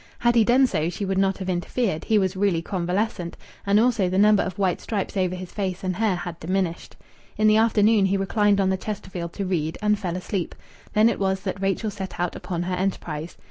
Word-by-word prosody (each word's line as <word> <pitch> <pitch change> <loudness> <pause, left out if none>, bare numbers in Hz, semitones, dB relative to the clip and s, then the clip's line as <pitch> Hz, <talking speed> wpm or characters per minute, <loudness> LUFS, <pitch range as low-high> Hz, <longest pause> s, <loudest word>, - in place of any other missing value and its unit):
Had 240 0 +2
he 230 -2 +5
done 250 +4 +5
so 160 -9 0
she 195 +3 -4
would 190 0 0
not 195 0 +2
have 190 - -6
interfered; 180 0 -1
he 220 - +3
was 190 -1 +1
really 190 -4 +1
convalescent, 180 0 -2 0.3
and 200 +1 +5
also 225 -5 +2
the 185 - -1
number 210 +1 +5
of 185 -1 -4
white 190 -3 0
stripes 205 -3 -3
over 185 -2 0
his 180 -1 -8
face 190 -3 -3
and 185 -1 -2
hair 215 -3 +2
had 175 -1 -6
diminished. 180 0 -2 0.4
In 215 - +2
the 215 0 +5
afternoon 215 -2 +4
he 195 +1 +1
reclined 205 +1 +2
on 190 -1 +2
the 190 - 0
Chesterfield 185 -4 -5
to 200 - -3
read, 165 -4 -1
and 210 -1 +1
fell 180 -3 -3
asleep. 185 -1 -3 0.4
Then 215 +1 +5
it 230 - 0
was 190 -1 0
that 195 -1 -4
Rachel 195 +3 0
set 195 -2 -7
out 175 -1 -1
upon 175 -1 -4
her 180 +1 -3
enterprise. 175 -4 -3
195 Hz, 220 wpm, -24 LUFS, 180-210 Hz, 0.4 s, he